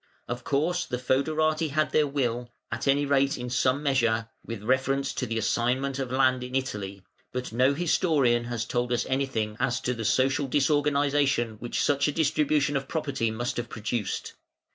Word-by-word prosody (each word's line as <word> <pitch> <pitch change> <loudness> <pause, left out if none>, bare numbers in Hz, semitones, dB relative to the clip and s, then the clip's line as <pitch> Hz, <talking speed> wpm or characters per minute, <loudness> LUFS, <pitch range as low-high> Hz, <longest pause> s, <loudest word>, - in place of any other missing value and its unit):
Of 120 0 -4
course 170 +7 0
the 125 - -2
fœderati 155 +5 +1
had 155 +2 0
their 150 -1 +3
will, 125 -4 -1 0.2
at - - -3
any 140 +1 +3
rate 140 0 +2
in 125 0 -5
some 130 +3 +1
measure, 115 -5 +1
with 115 -3 -7
reference 130 +3 +1
to 130 - -3
the 115 0 -2
assignment 130 +5 0
of 130 -2 -3
land 130 -1 +2
in 125 +1 -6
Italy, 100 -7 -3 0.3
but 125 -2 -4
no 130 +4 +3
historian 145 -8 +2
has 120 -2 -3
told 120 +1 -1
us 120 - +1
anything 130 -6 -1
as 120 +1 +1
to 125 - -1
the 115 -2 -5
social 130 +5 +2
disorganisation 140 -4 +2
which 120 +1 -2
such 140 0 +2
a - - +1
redistribution 150 -1 +1
of 135 0 -1
property 140 -7 -1
must 120 +3 -3
have 120 -1 -3
produced. 110 -2 -3
130 Hz, 175 wpm, -27 LUFS, 120-140 Hz, 0.3 s, their